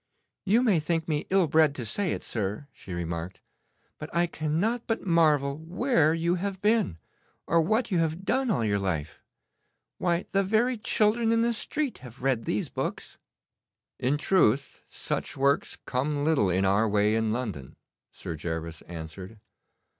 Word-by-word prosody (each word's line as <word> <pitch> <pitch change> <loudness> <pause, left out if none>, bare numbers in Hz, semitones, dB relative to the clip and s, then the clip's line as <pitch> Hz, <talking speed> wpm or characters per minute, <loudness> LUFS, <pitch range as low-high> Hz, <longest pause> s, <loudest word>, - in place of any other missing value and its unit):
'You 220 +6 +4
may 205 -9 +3
think 160 +1 -1
me 150 -2 -1
ill 190 -1 +4
bred 155 -1 +3
to 125 - -5
say 180 - -1
it, - - -3
sir,' 105 +4 -3
she - - -12
remarked, 85 +1 -4 0.6
'but 155 - -6
I 170 +1 +4
cannot 170 +9 -1
but 225 -2 -2
marvel 150 -5 +3
where 165 - +2
you 170 +1 +1
have 195 -1 -3
been, 210 - +2 0.5
or 170 - +3
what 220 +8 0
you 180 - +2
have 165 +3 -1
done 265 +3 +1
all 140 - +1
your 100 -1 +1
life. 80 -6 -3 0.8
Why, 175 0 0
the 195 0 +2
very 225 +5 +1
children 220 +2 +2
in 230 0 +3
the 235 0 +2
street 285 +4 -2
have 125 0 -12
read 130 -4 +1
these 105 - -1
books.' - - -5 0.8
'In 135 +4 +1
truth, 140 - +2
such - - -4
works 140 +1 +1
come 145 +3 -1
little 145 -12 +3
in 95 +2 +1
our 100 +3 +3
way 105 +1 +2
in 110 -1 +1
London,' 105 - -4 0.4
Sir 85 - -6
Gervas 80 0 -5
answered. 90 +5 -8
150 Hz, 160 wpm, -27 LUFS, -, 0.8 s, You